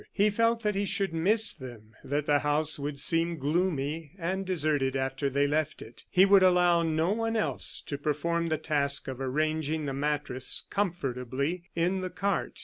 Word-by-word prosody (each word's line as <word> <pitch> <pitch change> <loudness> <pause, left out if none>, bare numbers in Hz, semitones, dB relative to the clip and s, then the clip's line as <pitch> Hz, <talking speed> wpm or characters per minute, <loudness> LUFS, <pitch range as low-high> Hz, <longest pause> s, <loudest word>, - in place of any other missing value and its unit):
He 210 +1 +2
felt 230 +2 +1
that 210 0 +1
he 200 +1 -1
should 195 -2 -1
miss 205 +6 +3
them, 120 -4 -11
that 145 +2 -2
the 145 -1 +3
house 150 +1 +1
would 140 0 -4
seem 165 +3 +2
gloomy 155 0 -1
and 190 +2 -3
deserted 150 -7 0
after 135 +1 -1
they 140 +1 +1
left 155 +1 -1
it. 115 +1 -11
He 185 +1 +5
would 195 -1 +6
allow 180 -2 +4
no 160 +2 0
one 225 +1 -1
else 135 - 0
to 140 - -6
perform 170 +3 -1
the 160 -1 0
task 145 -2 -1
of 130 0 -6
arranging 155 +3 -1
the 135 - -3
mattress 145 -2 -1
comfortably 150 - -2
in 175 +3 +1
the 185 - -3
cart. 195 +2 -2
155 Hz, 175 wpm, -28 LUFS, 140-180 Hz, -, would